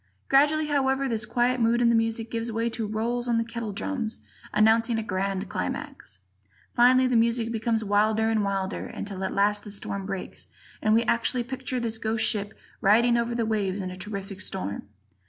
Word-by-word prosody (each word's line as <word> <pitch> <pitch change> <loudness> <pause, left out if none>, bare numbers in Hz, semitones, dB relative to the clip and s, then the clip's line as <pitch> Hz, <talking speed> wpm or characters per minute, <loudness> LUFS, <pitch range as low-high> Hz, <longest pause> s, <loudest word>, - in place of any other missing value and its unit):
Gradually, 295 +3 +4
however, 275 -2 +1
this 220 -3 -2
quiet 245 +2 +1
mood 230 +1 +3
in 240 -1 +4
the 235 - +4
music 225 0 0
gives 230 0 -2
way 230 +1 -1
to 225 -2 -3
rolls 235 +3 -1
on 235 -1 +2
the 230 - +2
kettle 230 -2 -5
drums 225 +2 -3 0.3
announcing 225 +2 +3
a 225 - -1
grand 195 0 -2
climax; 90 - -5 0.6
finally 255 +2 +5
the 255 -1 +1
music 230 0 +2
becomes 225 0 0
wilder 215 +2 +2
and 220 -2 +1
wilder 195 0 -2
until 195 -2 -6
at 190 - -1
last 205 +1 +1
the - - -8
storm 200 -1 -4
breaks 195 -2 -6 0.3
and 215 -1 +3
we 230 - +4
actually 240 +2 +1
picture 260 +1 -3
this 225 -2 -3
ghost 220 0 0
ship 205 -1 -2 0.2
riding 235 +4 +4
over 235 0 0
the 230 -1 0
waves 205 -3 -1
in 185 -1 -4
a - - -7
terrific 195 0 -5
storm. 100 - -4
225 Hz, 190 wpm, -26 LUFS, 205-235 Hz, 0.6 s, finally